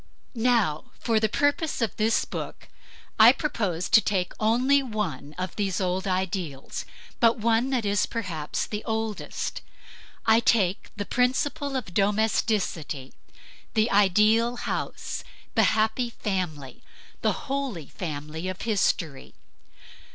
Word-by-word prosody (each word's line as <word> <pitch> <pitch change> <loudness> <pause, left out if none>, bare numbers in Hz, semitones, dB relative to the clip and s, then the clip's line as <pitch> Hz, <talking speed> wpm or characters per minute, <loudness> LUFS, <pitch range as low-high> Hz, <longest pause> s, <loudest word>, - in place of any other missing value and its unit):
Now, 225 - +2
for 225 -2 +1
the 220 0 +1
purpose 290 +6 +1
of 230 -3 -1
this 220 +1 +2
book, - - -6 0.5
I - - +10
propose 195 - -2
to 220 - +7
take 185 -4 -1
only 250 +6 +3
one 195 - -4
of 185 -1 -4
these 195 -4 0
old 185 +1 -1
ideals; 185 -7 -3 0.3
but 235 +1 +4
one 230 +3 +2
that 250 -5 0
is 205 0 +2
perhaps 175 -10 -3
the 210 0 -5
oldest. 220 -1 -3 0.6
I 225 0 +6
take 200 -6 +2
the 205 - -3
principle 270 +4 0
of 240 -9 -4
domesticity: 200 - 0 0.6
the 220 +1 +3
ideal 210 +4 +4
house; - - -4 0.3
the - - +4
happy 220 +3 +1
family, 175 - -4 0.4
the - - +2
holy 270 - -3
family 155 +1 -5
of 185 +1 -5
history. 185 -9 0
210 Hz, 120 wpm, -26 LUFS, 180-230 Hz, 0.6 s, I